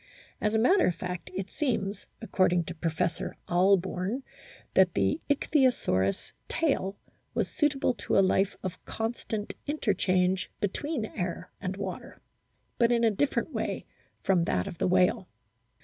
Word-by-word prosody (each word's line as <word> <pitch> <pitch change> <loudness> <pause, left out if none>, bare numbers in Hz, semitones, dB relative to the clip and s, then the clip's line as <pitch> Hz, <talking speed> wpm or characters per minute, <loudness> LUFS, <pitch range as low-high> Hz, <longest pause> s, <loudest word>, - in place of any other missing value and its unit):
As 210 +1 +1
a - - +5
matter 360 - +4
of 175 - +1
fact 180 -1 -5
it 190 +1 -4
seems, 220 -9 -2 0.2
according 180 -5 +2
to 175 - -6
Professor 165 +1 -2
Ahlborn, 190 +5 +2 0.5
that 185 -2 +4
the 95 +6 +1
Ichthyosaurus 255 - +2 0.2
tail 270 - 0 0.4
was - - +1
suitable 290 -6 +1
to - - -1
a - - +7
life 195 +1 +2
of 185 -1 -5
constant 225 -2 -3
interchange 190 - +1
between 235 - -2
air 180 -3 -4
and 190 -1 -3
water, 200 - -6 0.6
but 235 0 +4
in 235 -1 +3
a 225 - +5
different 270 +5 0
way - - -2 0.4
from 180 -3 +3
that 90 - 0
of 170 - -7
the - - +2
whale. 180 0 +3
195 Hz, 140 wpm, -29 LUFS, 180-235 Hz, 0.6 s, a